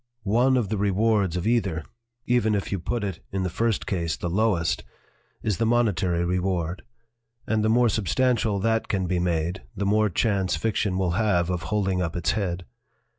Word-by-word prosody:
One 120 +6 +3
of 110 -6 0
the 105 -2 -1
rewards 100 -2 +2
of 90 - -3
either 100 -9 +1 0.4
even 120 -3 +2
if 100 - -3
you 100 - -1
put 105 +7 -2
it, 95 -4 -4
in 95 -1 -1
the 90 - -2
first 115 0 0
case, 85 -5 -1
the 85 - -3
lowest 95 -4 +1 0.6
is 105 -4 0
the 115 - +2
monetary 95 -7 +1
reward, 90 -1 -1 0.6
and 110 -1 0
the 110 - +2
more 120 +2 +4
substantial 110 +1 +1
that 115 +1 +1
can 95 -2 0
be 90 0 0
made, 85 0 -1
the 100 0 -2
more 105 +1 +3
chance 95 -1 +1
fiction 95 +2 0
will 95 -2 +1
have 90 -3 +1
of 90 -1 -2
holding 95 -3 0
up 85 -3 -2
its 85 -1 +1
head. 90 -4 -2
100 Hz, 180 wpm, -25 LUFS, 90-110 Hz, 0.6 s, more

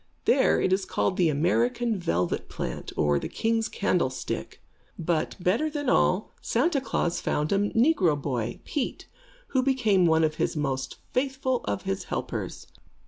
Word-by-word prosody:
There - - +4
it 185 - +2
is 190 +1 +1
called 185 - 0
the 175 -3 +3
American 225 - +1
Velvet 90 - -1
Plant, - - -5
or 75 -2 +3
the - - -5
King's 225 0 0
Candlestick. 170 -10 -1 0.4
But, 165 -1 -1
better 210 - +1
than 290 -3 -2
all, 185 +4 +2
Santa 275 +4 +1
Klaas 175 -9 -1
found 150 +1 -1
a 200 - +3
negro 225 - +3
boy, 120 -5 -3
Pete, 280 -4 -3 0.4
who 260 - +2
became 225 -9 +3
one 160 0 +4
of 155 0 0
the - - 0
most 135 -3 -2 0.2
faithful 260 -1 0
of 100 -1 -2
his 95 - -3
helpers. - - -4
185 Hz, 150 wpm, -27 LUFS, 150-245 Hz, 0.4 s, There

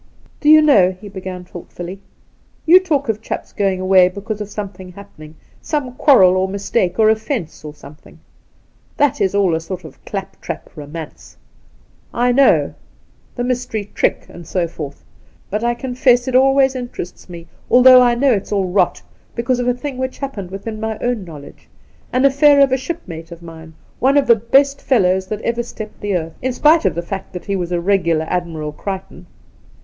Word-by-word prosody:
' - - -31
Do 295 - +3
you 310 0 +8
know,' 190 -11 +4
he 205 0 -10
began 185 -2 -7
thoughtfully, 175 +2 -9 0.3
' - - -38
you 345 +3 +8
talk 300 -7 -1
of 220 -1 -2
chaps - - -6
going 195 -3 0
away 185 -1 +5
because 210 +3 -6
of 210 - -5
something 190 -3 -8
happening 160 -6 -13 0.2
— - - -31
some 280 -5 -1
quarrel 195 -10 +5
or 190 0 +1
mistake 195 -1 -1
or 220 - +4
oflfence 220 - -1
or 150 - -7
soniething. 150 0 -16 0.8
That 285 -6 +1
is 195 0 +1
all 195 -4 +2
a 160 - 0
sort 180 +2 -7
of 155 -4 -14
clap 195 -1 -7
trap 170 - -7
romance, 150 +1 -10 0.8
I 245 +1 +2
know 275 +2 +3 0.6
^the 245 - -1
mystery 245 -5 -3
trick, - - 0
and 170 -2 -12
so 175 -1 -1
forth; 150 -4 -8 0.5
but 210 +3 -2
I 240 0 +1
confess 250 -1 +1
it 260 - -2
always 270 +1 +4
interests 245 -9 -7
me, 170 -1 -9 0.2
although 255 0 +8
I 240 -1 +3
know 265 +1 +3
it's 200 -1 -3
all 200 -2 +1
rot, 190 +3 +1 0.3
because 245 +1 -1
of 245 - -1
a 245 - +3
thing 260 0 -6
which 260 0 -3
happened 225 -10 -6
within 205 +3 -7
my 220 0 -3
own 245 -4 -2
knowledge 150 -5 -13 0.2
— - - -33
an 255 +1 +1
aflfair 280 +1 +5
of 270 - +1
a - - +3
shipmate 185 - -7
of 170 0 -11
mine, 160 -1 -12 0.2
one 270 +3 +3
of 280 - +3
the 235 - +6
best 275 +6 +2
fellows 190 -6 +1
that 215 +2 -5
ever 235 0 -1
stepped 215 -2 -9
the 205 -2 -1
earth, 165 -1 -6
in 260 0 -1
spite 305 +1 +4
of 180 -5 +1
the 170 - -3
fact 190 +2 -7
that 180 - -7
he 200 - -2
was 180 -2 -3
a 175 - 0
regular 170 -4 +1
Admirable 165 -4 -3
Crichton. 185 +1 -7
205 Hz, 195 wpm, -18 LUFS, 180-250 Hz, 0.8 s, you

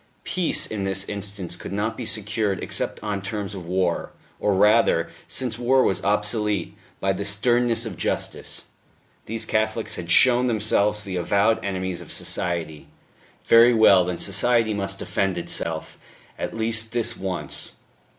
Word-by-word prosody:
Peace, 180 -3 +1
in 105 -3 -4
this 95 0 -1
instance, 100 -3 -4
could - - -8
not 105 +3 -1
be 120 -2 -5
secured 105 -1 -1
except - - -3
on 105 -2 -2
terms 100 0 -4
of 90 -4 -8
war 90 -1 0 0.3
or 105 -2 +1
rather, 105 -4 +4 0.2
since 120 -3 -3
war 130 +2 +3
was 95 - 0
obsolete 105 -2 0 0.2
by 95 0 +1
the 100 - -4
sternness 115 +3 +1
of 100 -7 -6
justice. - - -2 0.6
These 115 +1 -2
Catholics 110 +1 -1
had 85 -1 -7
shown 125 +4 +6
themselves 105 -2 +1
the 95 -3 -4
avowed 100 +5 +2
enemies 95 -2 -3
of - - -10
society; 85 -4 -2 0.6
very 115 +1 +6
well, 100 -4 +6
then 90 -1 -3
society 115 +3 +2
must 100 -1 -2
defend 95 -1 -1
itself, 85 - -4 0.4
at - - -5
least 110 0 0
this 120 -2 +2
once. 95 -2 -4
105 Hz, 150 wpm, -23 LUFS, 95-115 Hz, 0.6 s, shown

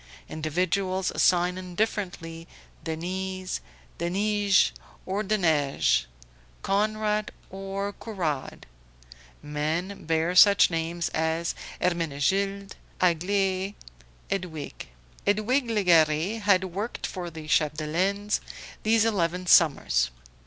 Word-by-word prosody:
Individuals 185 +4 -1
sign 180 0 +3
indifferently, 180 -3 -3 0.4
Denise, 185 +3 -4 0.4
Denije 200 +3 +2 0.3
or 195 +3 -1
Deneije; 150 - +2 0.6
Conrad 215 +1 0 0.2
or 195 +1 -4
Courade; 170 -12 -4 0.8
men 155 +6 -3
bear 160 +2 +1
such 200 0 +7
names 165 +1 -2
as 160 +1 -1 0.3
Hermenegilde, 180 +4 0 0.3
Aglae, 190 +3 +1 0.6
Edwige. 175 -6 -4 0.4
Edwige 235 +5 +2
Legare 175 -1 +3
had 200 -2 +4
worked 195 +5 -4
for 180 -2 -5
the 160 -2 -9
Chapdelaines 165 +8 +1 0.4
these 220 0 +3
eleven 180 -4 0
summers. 140 - +4
185 Hz, 80 wpm, -26 LUFS, 165-200 Hz, 0.8 s, such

